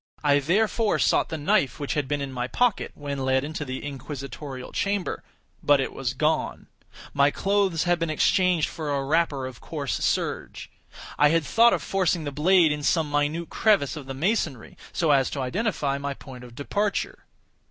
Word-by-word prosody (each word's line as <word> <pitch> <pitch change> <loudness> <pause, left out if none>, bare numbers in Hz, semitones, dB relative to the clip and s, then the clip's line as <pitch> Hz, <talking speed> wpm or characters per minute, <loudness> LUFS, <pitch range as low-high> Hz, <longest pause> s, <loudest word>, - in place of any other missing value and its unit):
I 145 -1 +4
therefore 210 - +1
sought - - +2
the 160 - -3
knife 145 -1 +1
which 145 - -2
had 145 -3 -1
been 145 0 -1
in 140 -1 -4
my 125 -1 -3
pocket, 245 - 0
when 140 -1 -5
led 130 0 +1
into 150 0 -4
the 130 0 -6
inquisitorial 140 -1 -7
chamber; 200 -2 -2 0.4
but 145 -1 +4
it 135 - -2
was 130 -1 -3
gone; 155 +3 0 0.5
my 140 0 +4
clothes 195 -1 +1
had 175 -1 +1
been 165 -1 -1
exchanged 175 +1 +2
for 155 -3 -5
a 140 -1 -1
wrapper 150 -3 +1
of 130 -2 -9
coarse 145 -4 -4
serge. - - -2 0.5
I 150 - +6
had 165 0 +2
thought 230 - +5
of - - -1
forcing 180 -3 0
the 145 - -4
blade 165 +3 +4
in 150 0 -2
some 150 +1 +1
minute 145 +3 -1
crevice 195 - +2
of 145 -4 -8
the 135 - -5
masonry, 155 - -1 0.2
so 160 -3 +1
as 135 -2 +3
to 140 - -4
identify 145 - -1
my 140 0 -4
point 130 -3 -11
of 120 -1 -12
departure. 200 +9 -2
145 Hz, 185 wpm, -25 LUFS, 135-170 Hz, 0.5 s, I